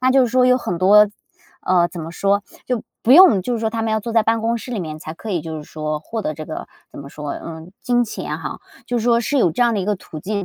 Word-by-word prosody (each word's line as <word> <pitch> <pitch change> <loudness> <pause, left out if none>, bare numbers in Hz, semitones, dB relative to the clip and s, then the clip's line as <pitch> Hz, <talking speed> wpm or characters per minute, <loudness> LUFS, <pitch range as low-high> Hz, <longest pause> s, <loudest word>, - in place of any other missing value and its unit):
那 255 0 +3
就 265 0 +5
是 245 - +1
说 250 +1 +3
有 250 0 +5
很 180 -8 -3
多 210 +3 +6 0.5
呃， 180 -2 +3
怎 175 - -8
么 160 +1 -6
说？ 200 +3 +1 0.2
就 250 -3 -1 0.2
不 245 - +4
用 340 - +8
就 245 - -2
是 225 - -3
说 220 - 0
他 225 0 -3
们 225 - -1
要 220 - +1
坐 230 +2 -5
在 225 - +5
办 225 +1 +1
公 230 +1 0
室 250 - -9
里 225 -6 -2
面 155 -2 -6
才 155 - -7
可 220 - -10
以， 175 - 0
就 160 -1 -6
是 150 - -8
说 155 0 -4
获 220 +8 -5
得 155 - -2
这 155 - -7
个， 155 - -6 0.2
怎 - - -12
么 140 - -9
说？ 150 -1 -6
嗯， 165 +1 -8
金 245 0 +2
钱 220 - -5
哈， - - -6 0.3
就 245 - -1
是 225 - -3
说 235 -1 +3
是 280 +5 -1
有 180 - +3
这 245 - +1
样 235 - +3
的 200 - 0
一 - - -2
个 210 +1 +1
途 165 -4 -10
径， 200 +3 -3
210 Hz, 320 characters per minute, -20 LUFS, 165-235 Hz, 0.5 s, 用